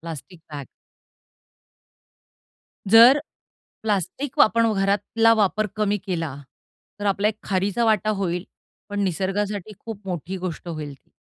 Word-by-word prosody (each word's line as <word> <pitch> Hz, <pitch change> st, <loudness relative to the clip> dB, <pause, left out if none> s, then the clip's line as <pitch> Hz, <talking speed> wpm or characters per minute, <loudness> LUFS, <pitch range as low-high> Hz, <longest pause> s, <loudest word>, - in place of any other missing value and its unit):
Plastic 165 Hz, +2 st, -9 dB
bag. 140 Hz, -2 st, -6 dB, 2.2 s
जर 235 Hz, +5 st, +9 dB, 0.7 s
plastic 220 Hz, -, -2 dB
वापण 230 Hz, +1 st, +4 dB
घरातला 205 Hz, +3 st, +2 dB
वापर 215 Hz, 0 st, +1 dB
कमी 210 Hz, -1 st, +1 dB
केला, 165 Hz, -7 st, -3 dB, 0.6 s
तर 205 Hz, -, -4 dB
आपला 200 Hz, +1 st, +2 dB
एक 215 Hz, 0 st, -2 dB
खारीचा 200 Hz, +4 st, 0 dB
वाटा 215 Hz, -1 st, +2 dB
होईल 180 Hz, -1 st, -1 dB, 0.5 s
पण 205 Hz, 0 st, -3 dB
निसर्गासाठी 195 Hz, +3 st, -2 dB
खूप 210 Hz, -3 st, -9 dB
मोठी 180 Hz, +1 st, -4 dB
गोष्ट 180 Hz, -1 st, -6 dB
होईल 155 Hz, -4 st, -5 dB
ती. 135 Hz, -, -23 dB
200 Hz, 120 wpm, -23 LUFS, 180-215 Hz, 2.2 s, जर